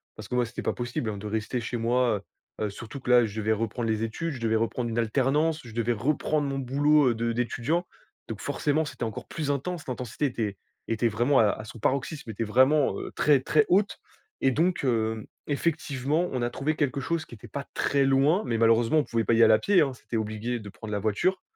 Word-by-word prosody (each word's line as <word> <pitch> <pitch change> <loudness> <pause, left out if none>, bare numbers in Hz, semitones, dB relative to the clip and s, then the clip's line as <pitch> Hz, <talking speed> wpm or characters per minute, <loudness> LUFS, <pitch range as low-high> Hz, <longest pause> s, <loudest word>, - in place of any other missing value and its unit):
Parce 110 - -9
que 125 - -2
moi, 125 -1 +2
c'était 120 - -6
pas - - -1
possible, 120 -2 -3
hein, 105 - -4
de 105 +2 -6
rester 110 +3 -2
chez 115 +2 -4
moi 115 -3 +1 0.4
heu. 110 - 0
Heu, 105 - -2
surtout 115 +6 -8
que 125 - -6
là, 125 -1 +6
je 110 0 -5
devais 110 +1 +1
reprendre 115 +1 -2
les 110 0 0
études, 165 +10 -3
je 130 - -7
devais 115 -1 +1
reprendre 115 +1 -1
une 115 - -4
alternance, 145 +7 +1
je 115 -3 -11
devais 115 +1 0
reprendre 145 +4 0
mon 135 0 -2
boulot, 140 +2 +3
heu, 120 - 0
de 115 +1 -1
d'étudiant. 125 +8 -1 0.4
Donc - - -5
forcément, 155 +2 0
c'était 145 - -6
encore 110 -1 -6
plus 150 -3 -2
intense. 155 +3 -3
L'intensité 125 +2 -3
était 110 -7 -2 0.3
était 115 +1 +1
vraiment 120 +6 +2
à 105 -2 +5
à 110 - -3
son 110 +2 -10
paroxysme, 135 +2 -1
était 110 +2 -3
vraiment, 130 +6 +3
heu, - - -6
très, 145 -3 +4
très 150 +2 +3
haute. 200 +3 +2 0.4
Et 135 - +4
donc, 170 +4 +1
hem, 110 -3 0 0.2
effectivement, 150 +1 0
on 130 - -2
a 120 - 0
trouvé 155 +5 -2
quelque 140 -3 0
chose 160 +4 -2
qui 120 - -11
était 105 - -13
pas 140 - -5
très 140 -1 +1
loin. 140 +9 +3
Mais 115 -1 -1
malheureusement, 115 +5 +4
on - - +2
pouvait 115 -1 0
pas 115 - +2
y 115 - +4
aller 110 -1 +7
à - - +4
pied, 200 -2 +4
hein. 135 -3 +1
C'était 120 -2 -5
obligé 110 +2 -2
de 105 - -10
prendre 110 +2 -9
la 105 - -1
voiture. 110 - 0
125 Hz, 235 wpm, -27 LUFS, 115-145 Hz, 0.4 s, aller